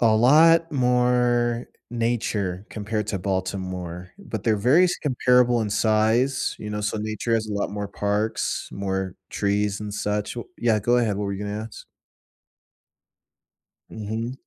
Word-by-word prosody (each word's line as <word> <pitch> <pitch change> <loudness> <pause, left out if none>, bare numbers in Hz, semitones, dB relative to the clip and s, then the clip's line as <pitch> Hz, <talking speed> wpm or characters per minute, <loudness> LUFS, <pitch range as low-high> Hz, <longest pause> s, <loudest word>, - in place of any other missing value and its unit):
a 110 -2 +4
lot 165 +8 +5
more 125 -2 +2 0.2
nature 110 -5 -1
compared 105 0 -3
to 100 -3 -2
Baltimore, 95 -2 -4
but 115 - -6
they're 110 -2 +3
very 150 - +5
si - - 0
comparable 125 -3 +3
in 105 - -4
size, 110 +5 +2
you 105 - -6
know, 105 0 -3
so 105 +1 -1
nature 110 +2 -3
has 110 -1 0
a 105 - -5
lot 100 0 -1
more 100 -1 -4
parks, 105 +2 -1
more 95 -1 -3 0.2
trees 100 +1 0
and 105 -1 -5
such 105 +1 -2
wh 120 - -5
yeah, 115 -2 +2
go 120 +4 +2
ahead, 110 -4 +1
what 105 - -2
were 100 - -2
you 100 +1 -4
gonna 105 +1 -4
ask? 115 - -12 2.1
Mhm. 110 +3 -4
110 Hz, 155 wpm, -24 LUFS, 100-120 Hz, 2.1 s, lot